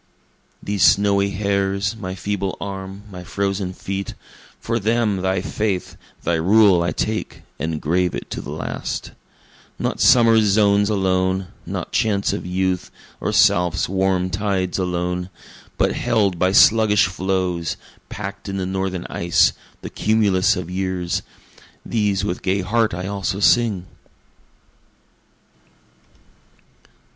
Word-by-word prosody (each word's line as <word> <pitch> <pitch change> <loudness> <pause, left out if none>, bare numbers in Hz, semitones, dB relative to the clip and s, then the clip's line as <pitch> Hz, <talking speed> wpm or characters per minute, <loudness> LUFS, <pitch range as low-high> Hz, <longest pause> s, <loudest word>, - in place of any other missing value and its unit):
These 100 -1 -2
snowy 100 0 +4
hairs, 100 +1 -1
my 95 -4 -6
feeble 100 +1 -3
arm, 95 0 -6
my 90 -1 -8
frozen 100 +1 -2
feet, 95 +1 -5 0.4
For 115 +1 -2
them 110 -1 +1
thy 95 0 0
faith, 100 -2 -2 0.3
thy 85 0 +1
rule 95 +1 +5
I 85 - 0
take, 110 0 -3 0.2
and 80 -1 -2
grave 90 +4 0
it - - -7
to - - -4
the - - -9
last; - - -4 0.7
Not - - -2
summer's 115 -3 +6
zones 100 0 +3
alone 95 -2 0 0.2
not - - -4
chants 100 -3 +1
of - - -4
youth, 95 0 -1 0.3
or - - -2
south's 90 -1 +3
warm 95 -1 0
tides 95 -1 -1
alone, 90 0 -2 0.5
But - - +2
held 100 -5 0
by 95 0 +3
sluggish 105 -1 +5
floes, 90 -2 -2 0.3
pack'd 100 +1 -6
in 95 - -3
the 95 - -2
northern 95 -1 -3
ice, 85 0 +2 0.3
the - - -6
cumulus 105 -1 +2
of 90 -1 -5
years, 90 -2 -2 0.6
These 105 -3 0
with 90 -3 -3
gay 95 +1 0
heart 110 +2 +1
I 90 +1 -5
also 100 0 -2
sing. 105 -4 +3
95 Hz, 125 wpm, -21 LUFS, 90-100 Hz, 0.7 s, summer's